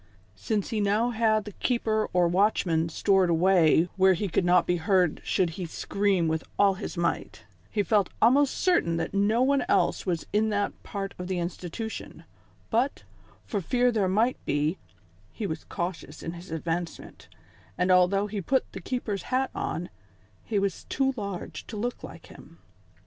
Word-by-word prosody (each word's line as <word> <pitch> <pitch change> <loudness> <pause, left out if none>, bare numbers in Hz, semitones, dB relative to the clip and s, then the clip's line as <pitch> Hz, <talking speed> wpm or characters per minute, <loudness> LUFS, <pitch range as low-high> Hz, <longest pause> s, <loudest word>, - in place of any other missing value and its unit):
Since 210 - -2
he 220 -2 0
now 210 +4 +2
had 220 -2 +2
the 210 - -7
keeper 220 -1 0
or 180 -1 +3
watchman 175 -3 +2
stored 190 +2 +2
away 170 -1 +4
where 190 0 +5
he 200 +3 -2
could 175 - +1
not 175 0 +4
be 175 - +1
heard 180 -1 +2
should 180 -3 +1
he 175 - -3
scream 195 +1 0
with 160 0 -1
all 200 -1 +5
his 185 - -7
might, 170 0 -2 0.3
he 205 - 0
felt 200 -1 +2
almost 270 +4 +4
certain 340 - +2
that 165 - -3
no 210 +5 +2
one 275 -1 +2
else - - +2
was 175 -4 -2
in 215 +1 +2
that 205 -1 0
part 195 -1 -5
of 180 - -5
the 185 -1 -2
institution; 175 +5 -5 0.5
but, 245 +5 0 0.4
for 205 -4 -2
fear 245 +6 +2
there 210 -5 +1
might 225 +6 +1
be, 150 +5 0 0.5
he 215 - -5
was 160 -5 -4
cautious 170 -3 -5
in 165 - -4
his 175 +2 -10
advancement, 165 +1 -5 0.5
and 180 +1 +2
although 185 +2 +4
he 210 -1 -4
put 265 +8 0
the - - -8
keeper's 215 -6 -3
hat 260 +1 +1
on, 170 +2 -3 0.6
he 215 - -2
was 195 -2 -1
too 270 0 0
large 200 -5 -6
to 215 - -7
look 240 +4 -3
like - - -10
him. - - -15
195 Hz, 170 wpm, -27 LUFS, 175-220 Hz, 0.6 s, where